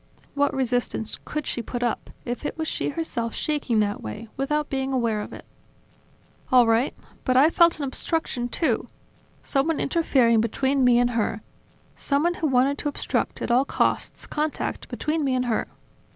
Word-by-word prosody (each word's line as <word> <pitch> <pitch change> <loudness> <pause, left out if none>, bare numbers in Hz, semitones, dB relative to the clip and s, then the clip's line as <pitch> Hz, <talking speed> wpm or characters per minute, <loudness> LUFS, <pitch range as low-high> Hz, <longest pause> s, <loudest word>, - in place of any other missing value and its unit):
"What 285 0 +2
resistance 245 -4 -1
could 300 -2 -3
she 240 - -2
put 245 +1 -4
up, 240 - -2 0.2
if 245 +3 -4
it 295 - -4
was 320 -1 -2
she - - -1
herself 265 -7 -3
shaking 280 -8 0
that 205 0 -1
way, 160 - -7
without 295 +3 0
being 265 0 -2
aware 230 -5 0
of - - -7
it?" - - -10 1.1
"All 250 -2 +7
right... 225 +4 +2 0.3
But 255 0 +2
I 295 +5 +6
felt 340 0 +5
an 300 - -4
obstruction 265 -2 -1
too, 245 -4 0 0.6
someone 290 +3 +1
interfering 255 -8 +3
between 265 +4 +1
me 245 -1 +5
and 245 0 +3
her, 220 -2 -1 0.5
someone 300 +5 +1
who 325 - -1
wanted 270 +1 +2
to 295 - -1
obstruct, 285 - -2
at - - -1
all 250 +3 +5
costs, - - -1
contact 305 0 -3
between 310 0 -1
me 265 -2 +1
and 250 0 0
her 235 -2 0
265 Hz, 170 wpm, -25 LUFS, 240-295 Hz, 1.1 s, All